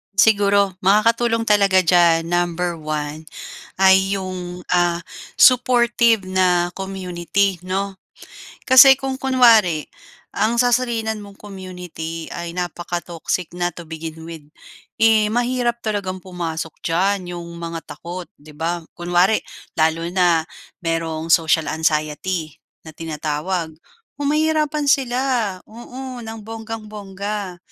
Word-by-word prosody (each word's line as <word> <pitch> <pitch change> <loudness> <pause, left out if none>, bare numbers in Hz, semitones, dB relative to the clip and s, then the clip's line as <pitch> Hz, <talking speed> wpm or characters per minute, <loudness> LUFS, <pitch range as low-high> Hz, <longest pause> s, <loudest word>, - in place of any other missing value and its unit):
Siguro, 200 -1 +3
makakatulong 230 +4 +2
talaga 200 -3 +4
diyan, 170 -1 +4
number 175 -1 -1
one 155 0 -4 0.5
ay 190 +1 +4
yung, 180 -1 -6
ah, 175 -1 +2 0.4
supportive 240 -4 +4
na 180 -2 +1
community, 190 -1 -2
'no? 195 +2 -3 0.7
Kasi 265 +1 +8
kung 270 -1 -3
kunwari 230 - +4 0.5
ang 230 +2 +1
sasalinan 235 -3 0
mong 200 0 -14
community 180 -5 -7
ay 170 0 -6
napaka-toxic 175 0 -3
na, 175 0 0
to 170 0 -10
begin 160 0 -7
with, 160 -3 -9 0.6
eh, 220 -1 +5
mahirap 240 -1 0
talagang 200 -3 -2
pumasok 165 -3 -5
diyan 180 +1 0
yung 170 0 -8
mga 165 -1 -5
takot, 175 +1 -8
'di 150 +1 -15
ba? 170 +2 -2 0.2
Kunwari 175 +4 +2 0.4
lalo 160 +1 +2
na 175 -2 +3 0.4
mayroong 165 -1 -2
social 160 -1 +3
anxiety 155 +1 -1 0.3
na - - -9
tinatawag, 160 +2 -3 0.5
oh, 290 - -2
mahirapan 305 0 +1
sila, 255 -3 +2 0.5
oo, 250 +2 -9
ng 225 0 -7
bonggang-bongga. 210 -3 -6
185 Hz, 110 wpm, -20 LUFS, 170-220 Hz, 0.7 s, Kasi